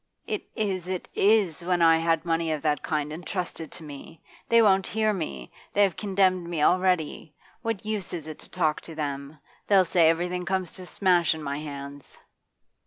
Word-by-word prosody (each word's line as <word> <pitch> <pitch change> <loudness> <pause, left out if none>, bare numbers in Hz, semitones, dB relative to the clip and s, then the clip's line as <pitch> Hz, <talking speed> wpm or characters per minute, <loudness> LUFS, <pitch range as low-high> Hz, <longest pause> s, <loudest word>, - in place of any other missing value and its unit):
'It - - -2
is 190 -6 -2
it 185 -1 -4
is 200 -6 +3
when 180 0 +1
I 165 -1 +6
had 165 0 +1
money 165 -1 0
of 155 -2 -2
that 150 -2 +1
kind 150 -1 -2
entrusted 175 -1 -5
to 165 - -10
me! 150 +2 -10 0.3
They 230 - +6
won't 195 -4 +4
hear 215 0 +1
me. 70 - -5 0.2
They 205 - +5
have 190 -5 +2
condemned 190 -3 +1
me 160 -4 -1
already. 180 -4 +1 0.3
What 225 -4 -3
use 215 -4 -3
is 165 -4 -5
it 155 -1 -8
to - - -11
talk 155 -4 0
to 165 - -10
them? 140 -1 -4 0.3
They'll 195 -2 +5
say 165 -1 +4
everything 175 +2 0
comes 185 -1 -2
to 185 -1 -9
smash 175 -4 +3
in 160 - -8
my 140 0 -3
hands. 140 -2 -8
170 Hz, 185 wpm, -26 LUFS, 155-190 Hz, 0.3 s, I